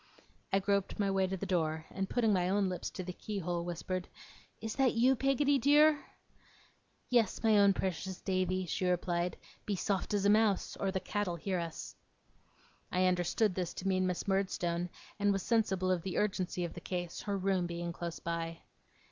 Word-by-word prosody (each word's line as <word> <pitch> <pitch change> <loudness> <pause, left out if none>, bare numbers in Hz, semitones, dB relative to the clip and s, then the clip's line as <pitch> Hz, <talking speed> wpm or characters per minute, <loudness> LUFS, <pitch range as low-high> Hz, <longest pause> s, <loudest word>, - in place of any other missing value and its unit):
I 195 - +4
groped 200 0 0
my 200 -2 +1
way 190 -1 +2
to 190 +1 -3
the 200 - -4
door, 160 -4 0
and 195 0 -3
putting 225 -4 +2
my 180 -1 +2
own 195 0 +2
lips 180 - -3
to 185 - -6
the 180 0 -5
keyhole, 175 -4 -3
whispered: 180 +1 -3 0.5
'Is 220 0 -4
that 265 -3 +3
you, 250 +3 +5
Peggotty 275 +2 +2
dear?' 295 +3 +5 1.1
'Yes, 235 -4 +2
my 220 -1 +5
own 200 -1 +6
precious 190 0 -3
Davy,' 185 -1 0
she 180 +2 -1
replied. 175 0 0 0.3
'Be 210 - 0
as 185 - -2
soft 200 +1 0
as 200 -1 +1
a - - +5
mouse, 215 -2 +2
or 195 - -1
the 190 0 -1
Cat'll 205 -3 -2
hear 185 +2 -2
us.' 165 -2 -6 1.0
I 185 0 +2
understood 180 +3 +2
this 180 -2 -3
to 195 - -4
mean 185 -1 +2
Miss 180 +1 -2
Murdstone, 180 -3 0 0.3
and 205 0 +3
was 195 -2 -1
sensible 190 -5 +1
of 180 -2 +1
the 185 +1 -4
urgency 185 -3 0
of 170 - -6
the 175 - -8
case; 175 -1 -4
her 200 -1 -2
room 190 -2 +1
being 170 0 -4
close 170 -1 -5
by. 165 0 -4
190 Hz, 190 wpm, -33 LUFS, 175-205 Hz, 1.1 s, own